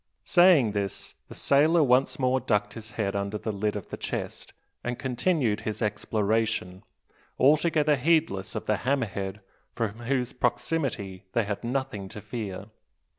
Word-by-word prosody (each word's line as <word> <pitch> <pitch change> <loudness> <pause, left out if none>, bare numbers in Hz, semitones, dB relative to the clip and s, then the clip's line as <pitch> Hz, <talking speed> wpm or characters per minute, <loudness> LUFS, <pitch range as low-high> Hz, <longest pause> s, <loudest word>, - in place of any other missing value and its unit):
Saying 175 - +5
this, 100 -2 -3
the - - -10
sailor 155 +4 +4
once 130 0 +3
more 130 0 +2
ducked 105 -4 0
his 110 -1 -10
head 100 -3 -1
under 100 +1 -2
the 110 - -3
lid 105 +1 -1
of 105 - -6
the - - -5
chest, - - -5 0.3
and 120 0 -2
continued 130 - 0
his 110 - -3
exploration, 105 -3 -1 0.6
altogether 150 +2 +4
heedless 145 - +1
of - - -4
the 105 - +1
"hammer 135 0 +1
head," 100 0 -5 0.3
from 115 -1 -2
whose 125 -3 0
proximity 120 - -1
they 115 - +2
had 100 +1 -4
nothing 120 -6 -3
to 105 - -8
fear. 105 -2 -6
115 Hz, 150 wpm, -27 LUFS, 105-135 Hz, 0.6 s, Saying